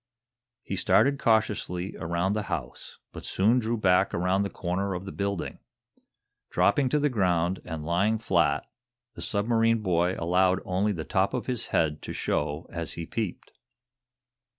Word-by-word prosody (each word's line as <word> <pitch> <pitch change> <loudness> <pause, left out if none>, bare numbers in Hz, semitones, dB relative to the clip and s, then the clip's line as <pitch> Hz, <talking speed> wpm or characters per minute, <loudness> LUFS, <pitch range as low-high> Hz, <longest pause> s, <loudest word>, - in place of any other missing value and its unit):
He - - -4
started 140 0 +3
cautiously 105 -5 0
around 85 +4 -1
the 105 - 0
house, 70 -8 -5
but - - -9
soon 110 +6 +2
drew 115 0 -1
back 90 -4 +3
around 90 +3 +1
the 100 - -1
corner 95 +2 -2
of 90 +2 -6
the 95 - -6
building. 100 -2 -3 0.9
Dropping 135 -3 +2
to 150 - +2
the 145 - +2
ground, 90 - +1
and 80 -3 -5
lying 100 +7 +2
flat, 85 - +1 0.5
the - - -10
submarine 115 +1 +1
boy 90 -1 +1
allowed 90 +2 +2
only 95 +3 +1
the 85 -5 -4
top 95 -1 +1
of - - -3
his 125 -3 -1
head 75 -2 0
to - - -6
show 75 +2 -2
as 85 -1 -3
he 85 - -5
peeped. 110 +1 -4
95 Hz, 155 wpm, -27 LUFS, 85-110 Hz, 0.9 s, started